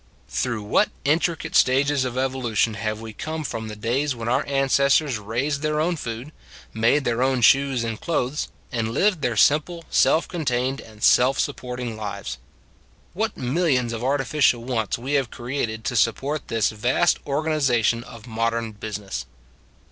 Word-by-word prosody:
Through 105 Hz, -, -2 dB
what 105 Hz, -, +2 dB, 0.2 s
intricate 160 Hz, +2 st, 0 dB
stages 135 Hz, +1 st, +3 dB
of 125 Hz, 0 st, -4 dB
evolution 130 Hz, -4 st, 0 dB
have 110 Hz, -1 st, -3 dB
we 110 Hz, -1 st, -8 dB
come 155 Hz, +7 st, -4 dB
from 115 Hz, -5 st, -4 dB
the 105 Hz, -, -6 dB
days 125 Hz, +6 st, -1 dB
when 115 Hz, -1 st, -6 dB
our 125 Hz, -, +2 dB
ancestors 140 Hz, -1 st, +2 dB
raised 125 Hz, +8 st, -2 dB
their 150 Hz, 0 st, 0 dB
own 170 Hz, +3 st, +1 dB
food, 120 Hz, 0 st, -6 dB, 0.4 s
made 115 Hz, +6 st, +3 dB
their 120 Hz, 0 st, 0 dB
own 130 Hz, -1 st, +2 dB
shoes 135 Hz, 0 st, +4 dB
and 115 Hz, -1 st, -4 dB
clothes, 150 Hz, -4 st, -1 dB, 0.2 s
and 115 Hz, -3 st, -2 dB
lived 200 Hz, -6 st, +2 dB
their 120 Hz, -4 st, -1 dB
simple, 160 Hz, +5 st, +3 dB
self 160 Hz, -, +3 dB
con 175 Hz, -3 st, -4 dB
tained 130 Hz, +1 st, 0 dB
and 110 Hz, -1 st, -13 dB
self 130 Hz, +2 st, +5 dB
supporting 125 Hz, -4 st, -3 dB
lives! 105 Hz, -2 st, -5 dB, 0.7 s
What -, -, -2 dB
millions 130 Hz, -3 st, +1 dB
of 115 Hz, +1 st, -4 dB
artificial 135 Hz, -2 st, +2 dB
wants 115 Hz, -4 st, -1 dB
we 130 Hz, +5 st, -4 dB
have 135 Hz, -4 st, +1 dB
created 120 Hz, -3 st, -4 dB
to 125 Hz, -, -1 dB
support 135 Hz, +7 st, 0 dB
this 115 Hz, -2 st, +1 dB
vast 120 Hz, +10 st, +1 dB
organiza 140 Hz, -5 st, +1 dB
tion 115 Hz, +2 st, +1 dB
of 115 Hz, -2 st, -12 dB
modern 115 Hz, -1 st, -1 dB
business 100 Hz, -, -6 dB
125 Hz, 160 wpm, -23 LUFS, 115-140 Hz, 0.7 s, self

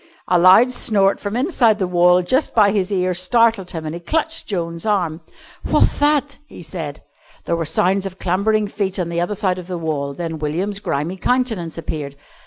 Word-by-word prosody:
A 180 Hz, -, +3 dB
loud 190 Hz, +8 st, +6 dB
snort 200 Hz, -5 st, +2 dB
from 205 Hz, +1 st, -4 dB
inside 250 Hz, -, +2 dB
the 195 Hz, -, -1 dB
wall 180 Hz, 0 st, +3 dB
just 260 Hz, -, 0 dB
by 205 Hz, -3 st, +5 dB
his 200 Hz, -1 st, -1 dB
ear 185 Hz, -2 st, 0 dB
startled 200 Hz, +1 st, +2 dB
him, 160 Hz, -2 st, -5 dB
and 155 Hz, -, -4 dB
he 170 Hz, -, -7 dB
clutched 320 Hz, -, -1 dB
Joan's 170 Hz, -4 st, -3 dB
arm. 180 Hz, -6 st, -1 dB, 0.4 s
"What'th -, -, +1 dB
that?" 290 Hz, -1 st, +1 dB
he -, -, -12 dB
said. 155 Hz, -3 st, -6 dB, 0.4 s
There 170 Hz, -, 0 dB
were 165 Hz, -1 st, -2 dB
sounds 185 Hz, +5 st, +1 dB
of 190 Hz, -1 st, -10 dB
clambering 205 Hz, +4 st, 0 dB
feet 195 Hz, -2 st, -3 dB
on 175 Hz, -3 st, -2 dB
the 170 Hz, 0 st, -2 dB
other 175 Hz, +4 st, -2 dB
side 185 Hz, -2 st, -1 dB
of 180 Hz, -, -10 dB
the 180 Hz, -1 st, -4 dB
wall, 145 Hz, -4 st, -3 dB
then 165 Hz, -1 st, -5 dB
William's 180 Hz, +7 st, -2 dB
grimy 165 Hz, +1 st, -3 dB
countenance 220 Hz, -8 st, -1 dB
appeared. 150 Hz, -4 st, -5 dB
185 Hz, 195 wpm, -19 LUFS, 170-210 Hz, 0.4 s, loud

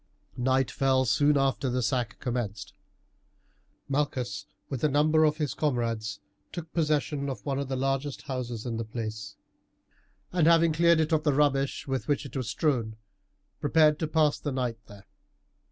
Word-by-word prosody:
Night 130 Hz, +1 st, +1 dB
fell 130 Hz, -1 st, +2 dB
soon 145 Hz, +7 st, +3 dB
after 135 Hz, -1 st, +1 dB
the 125 Hz, 0 st, 0 dB
sack 120 Hz, -1 st, -1 dB
commenced. 115 Hz, -6 st, -4 dB, 1.1 s
Malchus 140 Hz, -3 st, -2 dB, 0.2 s
with 135 Hz, -4 st, -5 dB
a 155 Hz, -, +4 dB
number 155 Hz, +2 st, +4 dB
of 150 Hz, 0 st, +1 dB
his 150 Hz, -4 st, -1 dB
comrades 115 Hz, -7 st, -1 dB, 0.3 s
took 165 Hz, -2 st, -7 dB
possession 150 Hz, -3 st, 0 dB
of 135 Hz, -, -6 dB
one 140 Hz, -1 st, -1 dB
of 140 Hz, -, -3 dB
the 135 Hz, -, -2 dB
largest 135 Hz, +1 st, -2 dB
houses 125 Hz, -4 st, -4 dB
in 115 Hz, -2 st, -3 dB
the 115 Hz, -, -2 dB
place, 110 Hz, -2 st, -6 dB, 1.0 s
and, 175 Hz, -3 st, +3 dB
having 165 Hz, -1 st, +5 dB
cleared 170 Hz, +1 st, +4 dB
it 160 Hz, +1 st, +1 dB
of 160 Hz, -1 st, +3 dB
the 150 Hz, -, +2 dB
rubbish 140 Hz, -1 st, +1 dB
with 135 Hz, -1 st, -2 dB
which 145 Hz, -1 st, 0 dB
it 140 Hz, -, -10 dB
was 130 Hz, -4 st, -2 dB
strewn, 115 Hz, -5 st, 0 dB, 0.6 s
prepared 150 Hz, 0 st, +4 dB
to 160 Hz, -, -1 dB
pass 155 Hz, -1 st, +2 dB
the 145 Hz, -, -3 dB
night 125 Hz, -3 st, -2 dB
there. 100 Hz, -1 st, -14 dB
135 Hz, 165 wpm, -28 LUFS, 120-150 Hz, 1.1 s, having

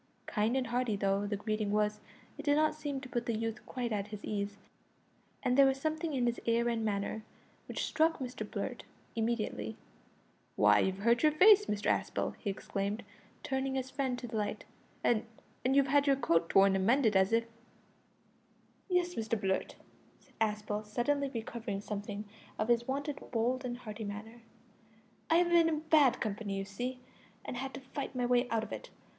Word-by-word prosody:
Kind 220 Hz, +4 st, +1 dB
and 260 Hz, -, 0 dB
hearty 240 Hz, -2 st, 0 dB
though 195 Hz, 0 st, +1 dB
the 205 Hz, -, -1 dB
greeting 215 Hz, 0 st, -2 dB
was, 210 Hz, 0 st, +1 dB, 0.4 s
it -, -, -7 dB
did 290 Hz, -1 st, +3 dB
not 310 Hz, +1 st, +3 dB
seem 290 Hz, -3 st, -4 dB
to 260 Hz, -, -8 dB
put 240 Hz, -1 st, -2 dB
the 230 Hz, -2 st, 0 dB
youth 225 Hz, +1 st, -3 dB
quite 245 Hz, -3 st, -3 dB
at 205 Hz, -1 st, -1 dB
his 210 Hz, -1 st, -8 dB
ease, 200 Hz, -1 st, -3 dB, 0.9 s
and 250 Hz, -, +2 dB
there 275 Hz, 0 st, +7 dB
was 270 Hz, 0 st, +2 dB
a -, -, -13 dB
something 315 Hz, +1 st, -1 dB
in 250 Hz, -2 st, +1 dB
his 240 Hz, 0 st, 0 dB
air 235 Hz, +1 st, +3 dB
and 230 Hz, -1 st, -1 dB
manner 210 Hz, +1 st, -1 dB, 0.5 s
which -, -, -2 dB
struck 320 Hz, +1 st, +2 dB
Mr 255 Hz, -2 st, -5 dB
Blurt -, -, -4 dB, 0.3 s
immediately. 225 Hz, -1 st, -1 dB, 0.8 s
"Why, -, -, +6 dB
you've 190 Hz, 0 st, +1 dB
hurt 235 Hz, +4 st, +3 dB
your 305 Hz, -, +5 dB
face, 415 Hz, +6 st, +7 dB
Mr 210 Hz, 0 st, -2 dB
Aspel," -, -, -1 dB
he 205 Hz, -, -3 dB
exclaimed, 200 Hz, +1 st, -3 dB, 0.4 s
turning 265 Hz, 0 st, -1 dB
his 260 Hz, 0 st, -2 dB
friend 265 Hz, -2 st, -1 dB
to 245 Hz, -, -6 dB
the 225 Hz, -1 st, -4 dB
light. 210 Hz, -1 st, -2 dB, 0.4 s
"And 225 Hz, -3 st, +3 dB, 0.4 s
and 260 Hz, +2 st, +2 dB
you've 280 Hz, -1 st, +6 dB
had 285 Hz, +1 st, +3 dB
your 275 Hz, -, +5 dB
coat 165 Hz, -10 st, +2 dB
torn 195 Hz, 0 st, +5 dB
and 190 Hz, -, +1 dB
mended 230 Hz, 0 st, +3 dB
as 190 Hz, +1 st, +4 dB
if 230 Hz, 0 st, +3 dB, 0.8 s
" -, -, -36 dB
"Yes, 360 Hz, -1 st, +2 dB
Mr 225 Hz, -3 st, -1 dB
Blurt," 190 Hz, -1 st, -1 dB, 0.4 s
said -, -, -26 dB
Aspel, 210 Hz, -1 st, 0 dB
suddenly 275 Hz, +6 st, 0 dB
recovering 225 Hz, -3 st, -4 dB
something 205 Hz, 0 st, -5 dB, 0.3 s
of 215 Hz, -, -1 dB
his 235 Hz, 0 st, +3 dB
wonted 285 Hz, +2 st, -2 dB
bold 250 Hz, +3 st, 0 dB
and 245 Hz, -1 st, -3 dB
hearty 215 Hz, -2 st, -7 dB
manner; 215 Hz, +3 st, -7 dB, 0.9 s
"I 325 Hz, -, +5 dB
have 345 Hz, +1 st, +4 dB
been 340 Hz, -1 st, +5 dB
in 310 Hz, -1 st, -1 dB
bad 310 Hz, -5 st, +4 dB
company, 205 Hz, -2 st, -2 dB
you 195 Hz, -, -3 dB
see, 245 Hz, +6 st, -4 dB, 0.4 s
and -, -, -4 dB
had 265 Hz, +2 st, -4 dB
to -, -, -6 dB
fight 270 Hz, 0 st, -6 dB
my 250 Hz, -1 st, 0 dB
way 245 Hz, 0 st, +2 dB
out 225 Hz, -1 st, +1 dB
of -, -, -8 dB
it. -, -, -6 dB
235 Hz, 190 wpm, -32 LUFS, 210-270 Hz, 0.9 s, there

